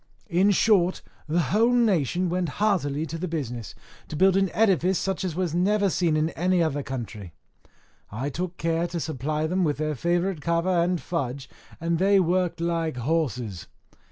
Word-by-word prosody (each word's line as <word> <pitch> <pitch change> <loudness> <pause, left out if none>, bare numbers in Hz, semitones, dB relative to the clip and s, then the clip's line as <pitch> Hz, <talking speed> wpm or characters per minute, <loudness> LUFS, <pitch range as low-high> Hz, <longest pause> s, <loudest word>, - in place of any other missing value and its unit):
In 185 +4 +4
short, 190 -3 +3 0.2
the 160 +3 +1
whole 230 +4 +4
nation 185 - +2
went 175 -1 -1
heartily 160 -8 +1
to 165 +1 -6
the 185 - -3
business, 125 - -5 0.3
to - - -7
build 190 +4 +4
an 195 -1 +2
edifice 190 -4 +2
such 190 0 -2
as 180 -4 -3
was 180 -3 -1
never 200 +3 +2
seen 165 -4 +1
in 155 +2 0
any 180 +2 +1
other 145 -3 -1
country. 115 -10 -7 0.8
I 130 +7 -3
took 180 +4 -4
care 165 +1 0
to 170 0 -4
supply 155 0 -2
them 180 +3 0
with 150 -3 0
their 155 0 -1
favourite 175 +3 -1
kava 170 +3 +1
and 175 +1 +1
fudge, 135 -6 -4 0.3
and 165 0 -1
they 195 +1 +4
worked 180 -1 +1
like 165 -4 -1
horses. 125 - -2
170 Hz, 170 wpm, -25 LUFS, 150-185 Hz, 0.8 s, In